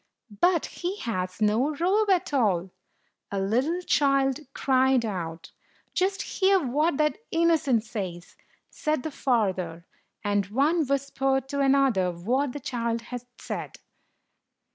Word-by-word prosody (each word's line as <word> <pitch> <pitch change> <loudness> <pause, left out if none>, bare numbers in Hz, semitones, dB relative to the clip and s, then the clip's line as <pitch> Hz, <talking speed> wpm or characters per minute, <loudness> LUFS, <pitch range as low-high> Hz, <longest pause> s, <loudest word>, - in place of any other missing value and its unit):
"But 350 -2 +4
he 365 +3 -4
has 185 -3 -2
no 240 +8 +2
robe 395 +7 +2
at 360 -5 +2
all!" 195 -9 +1 0.6
a 200 - -1
little 255 - 0
child 275 -4 +2
cried 260 -2 +2
out. 170 -5 -5 0.4
"Just 385 +1 0
hear 385 0 +2
what 295 +2 +1
that 305 +6 +1
innocent 320 -8 +2
says!" 185 -6 -6 0.4
said 305 -4 -1
the 315 - -4
father; 190 -11 -1 0.4
and 205 -2 +1
one 290 +8 +2
whispered 270 -1 0
to 280 0 -2
another 270 -9 +3
what 245 +11 -1
the 290 - -5
child 235 -3 -2
had 245 - -3 0.2
said. - - -6
265 Hz, 125 wpm, -26 LUFS, 210-305 Hz, 0.6 s, But